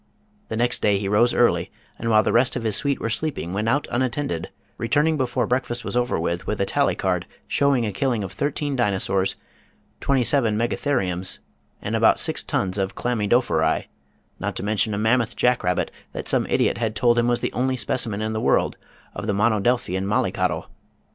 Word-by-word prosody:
The 110 - -4
next 120 +1 +1
day 105 -1 +3
he 100 0 -3
rose 110 +5 +3
early, 120 - +2 0.3
and 115 - -2
while 110 -1 +5
the - - +1
rest 125 +2 +3
of 125 - -3
his 110 -3 +1
suite 140 +3 +1
were 115 - -2
sleeping 115 - -2
went 105 +3 0
out 145 +5 +1
unattended, 120 - -2 0.3
returning 145 +7 +2
before 130 -4 0
breakfast 120 -1 -2
was - - -3
over 125 -5 +1
with 85 +5 -2
a 100 - +2
tally - - +1
card - - -1 0.2
showing 140 -4 +2
a 105 - -2
killing 120 -2 0
of 95 - -6
thirteen 145 0 -2
dinosaurs, 95 -5 0 0.6
twenty 135 -2 +1
seven 115 -3 +3
megatheriums, 110 -6 0 0.5
and - - -2
about - - +4
six - - +1
tons 95 +1 -1
of 95 0 -2
chlamy 115 -4 -1
dophori, 80 -10 +2 0.5
not - - -3
to - - -4
mention 105 0 0
a - - -3
mammoth 115 +2 +1
jack 125 0 +2
rabbit 90 0 0 0.2
that - - -6
some - - +1
idiot 95 - +1
had 110 -2 -1
told 120 +3 +3
him 120 - +2
was 120 -1 +1
the - - -2
only 130 +1 0
specimen 110 -4 -1
in 110 0 -2
the 110 - -2
world - - +2 0.4
of - - -6
the 105 - +1
monodelphian 105 -2 +1
mollycoddle. 105 - -1
115 Hz, 190 wpm, -23 LUFS, 100-125 Hz, 0.6 s, while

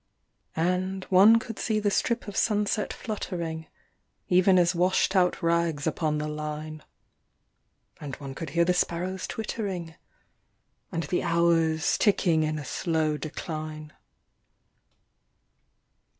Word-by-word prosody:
And 185 +3 -1
one 200 +5 +7
could 225 -1 -6
see 215 -2 0
the 205 -1 0
strip 235 +3 0
of 205 - -7
sunset 210 -1 +1
fluttering, 170 -7 -5 0.6
even 185 +1 +5
as 175 0 +4
washed 185 +2 +2
out 180 -1 +2
rags 165 -3 +1
upon 155 -1 0
the 150 0 -2
line, 150 0 -5 1.2
And 140 -3 -6
one 135 -2 -8
could 165 +4 -6
hear 170 - +5
the 180 - +3
sparrows 180 +2 -1
twittering, 195 -7 -4 1.0
and 165 -2 -2
the 180 - -1
hours 165 -2 +2
ticking 180 -6 +3
in 155 0 -1
a 150 - -6
slow 160 +1 0
decline. 155 0 -6
170 Hz, 120 wpm, -27 LUFS, 155-190 Hz, 1.2 s, one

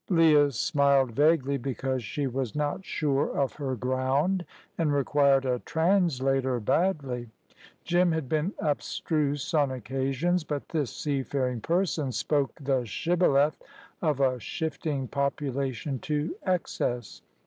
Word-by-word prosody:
Leah 155 -5 +5
smiled 140 0 +2
vaguely, 140 0 +2
because 130 0 -2
she 145 +7 -3
was 130 -3 -3
not 150 +5 -1
sure 145 -5 -1
of 140 -2 +1
her 135 -3 -2
ground, 130 - 0 0.3
and 160 -3 +1
required 140 -1 +3
a 125 -1 0
translator 135 -7 +1
badly. 130 - 0 0.5
Jim 175 0 +3
had 160 -4 -2
been 155 +6 0
abstruse 145 -1 -1
on 145 -3 +3
occasions, 135 +7 -1
but 145 -2 -4
this 150 -7 -1
seafaring 135 -4 -2
person 165 - 0
spoke 140 +2 0
the 135 -3 0
shibboleth 150 - +2 0.4
of 150 -5 +1
a 130 -2 +2
shifting 150 0 -3
population 140 -1 -2
to 150 +5 -2
excess. 125 - -2
140 Hz, 120 wpm, -27 LUFS, 130-155 Hz, 0.5 s, Leah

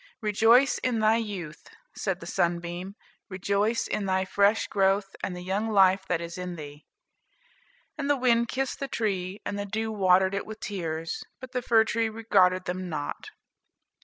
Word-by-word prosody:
"Rejoice 225 +5 +4
in 250 -2 0
thy 220 +1 +4
youth," 190 -9 -6 0.3
said 190 -3 -2
the - - -8
sunbeam; 175 +3 -2 0.3
"rejoice 200 +4 0
in 200 - -2
thy 190 0 +1
fresh 200 +3 +2
growth, 195 0 +1
and 180 - -2
the 180 - -7
young 200 +4 -1
life 190 -2 +4
that 175 - 0
is 170 +1 -7
in 180 -1 -5
thee." 145 -2 -10 1.1
And 285 -1 -2
the 290 - +3
wind 235 -2 +3
kissed 265 +2 -2
the 275 - -3
tree, 195 -5 -2
and 205 - -3
the 205 - -3
dew 220 +2 -2
watered 190 -2 +3
it 200 - -3
with 220 0 -8
tears; 165 -4 -4 0.2
but 255 0 -10
the 250 -1 -2
fir 225 -2 +4
tree 225 0 0
regarded 190 -5 +2
them 180 0 -4
not. 145 -3 -5
200 Hz, 170 wpm, -27 LUFS, 180-220 Hz, 1.1 s, Rejoice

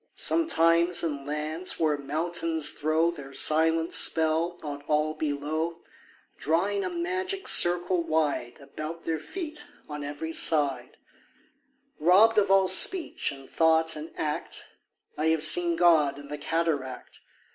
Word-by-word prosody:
Sometimes 170 - +2
in 145 -4 -4
lands 155 +4 -2
where 155 -2 +2
mountains 160 +2 -2
throw 155 +3 0
Their 140 -4 -11
silent 160 +3 +2
spell 160 +2 +2
on 145 -1 -6
all 150 +1 0
below, 155 +2 -3 0.6
Drawing 190 +6 0
a - - -2
magic 370 +3 -3
circle 175 +1 +3
wide 155 -7 -1
About 155 +4 -8
their 160 -1 -2
feet 310 - -7 0.2
on 150 -1 -6
every 145 +3 -6
side, 140 -7 0 1.0
Robbed 205 +7 +5
of 200 - 0
all 195 -1 +4
speech 330 - +2
and 135 -1 -12
thought 160 0 +2
and 155 +2 -8
act, 150 -1 -4 0.5
I 155 - +1
have 160 -1 +2
seen 170 +2 +3
God 160 -5 +3
in 145 0 -12
the 150 - -5
cataract. 150 -5 -3
160 Hz, 130 wpm, -26 LUFS, 150-175 Hz, 1.0 s, Robbed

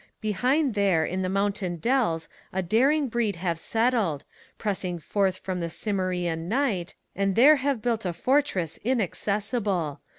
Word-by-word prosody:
Behind 250 - +1
there 195 -6 +2
in 185 +3 -2
the 185 - -1
mountain 195 -2 -1
dells 170 -5 0 0.2
a 190 0 -1
daring 270 - +3
breed 230 -4 0
Have 170 -1 -2
settled, 225 - 0 0.3
pressing 190 -4 -2
forth 190 +3 0
from 185 -1 -4
the 170 -1 -2
Cimmerian 180 -3 -2
Night, 215 -8 0 0.2
And 195 -1 0
there 290 +6 +7
have 275 -4 -1
built 230 -2 0
a 180 - -1
fortress 195 - 0
inaccessible. 205 - -1
200 Hz, 140 wpm, -26 LUFS, 180-240 Hz, 0.3 s, there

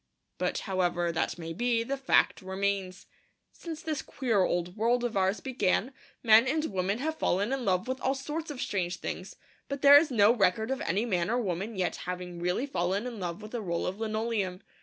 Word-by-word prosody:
But - - 0
however 175 -3 0
that 165 0 -1
may 165 -1 -6
be, 235 +4 +1
the 270 +4 -2
fact 270 -5 +2
remains. 190 0 -2 0.5
Since 325 -2 -8
this 310 -4 -2
queer 230 -7 0
old 175 0 0
world 235 +3 +1
of 240 -3 -2
ours 190 +2 +1
began, 255 -1 0 0.3
men 225 +1 +7
and 310 +3 +1
women 190 +2 0
have 315 +5 -3
fallen 200 +8 +1
in 265 -3 -2
love 185 +1 +1
with 260 0 -3
all 265 +1 +1
sorts 300 +4 -5
of 290 -4 -6
strange 180 -6 -1
things; 185 +1 -6 0.3
but 280 0 -5
there 285 0 +10
is 315 +1 -1
no 220 -3 +5
record 220 +2 +1
of 265 - -2
any 200 +7 0
man 180 -5 0
or 240 - +1
woman 200 0 -2
yet 185 -2 -1
having 180 -1 -5
really 180 +9 0
fallen 195 -4 -1
in 240 -4 -6
love 180 +2 -4
with 215 - -10
a 240 - -2
roll 170 -4 -2
of 190 +3 -3
linoleum. 215 -4 -2
210 Hz, 200 wpm, -29 LUFS, 185-250 Hz, 0.5 s, there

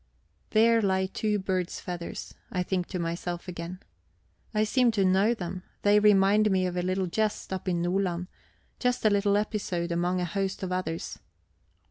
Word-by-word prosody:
There 230 +1 +4
lie 190 -2 +2
two 210 +2 -1
bird's 185 -2 -2
feathers, 175 -2 -6 0.2
I 180 -1 0
think 180 -1 -1
to 185 - -4
myself 170 +1 -3
again. 175 +1 -6 0.7
I 215 0 +2
seem 245 +3 +3
to 200 -3 +2
know 195 +5 +3
them; 180 -2 -5 0.2
they 205 0 +6
remind 210 +1 +5
me 190 -2 +2
of 180 -1 -2
a 180 - 0
little 185 +1 0
jest 210 +2 -1
up 190 0 -5
in 170 -1 0
Nordland, 180 -1 0 0.5
just 250 -2 0
a 215 - +6
little 200 0 +3
episode 190 -5 -2
among 175 +2 0
a 180 - 0
host 195 +2 -2
of 185 - -3
others. 175 -3 -3
190 Hz, 170 wpm, -28 LUFS, 180-205 Hz, 0.7 s, they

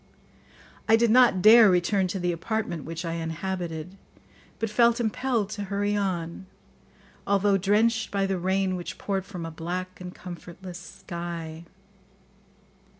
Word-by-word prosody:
I 225 - +8
did 230 0 +3
not 240 -7 +5
dare 220 0 +9
return 185 +2 +2
to 190 +2 -3
the 175 0 0
apartment 170 -2 -3
which 165 +2 -5
I 165 - -2
inhabited, 170 +1 -4 0.6
but 225 -1 -3
felt 235 +2 +4
impelled 235 -2 -1
to 205 -2 -4
hurry 205 +1 -1
on, 185 -2 -3 0.8
although 200 0 +3
drenched 220 +4 +2
by 195 -1 0
the 195 -1 -1
rain 190 +1 0
which 175 -1 -6
poured 195 -2 -3
from 180 -5 -6
a 165 - -6
black 180 +3 -5
and 180 0 -6
comfortless 180 0 -9
sky. 170 -2 -7
190 Hz, 140 wpm, -26 LUFS, 175-205 Hz, 0.8 s, dare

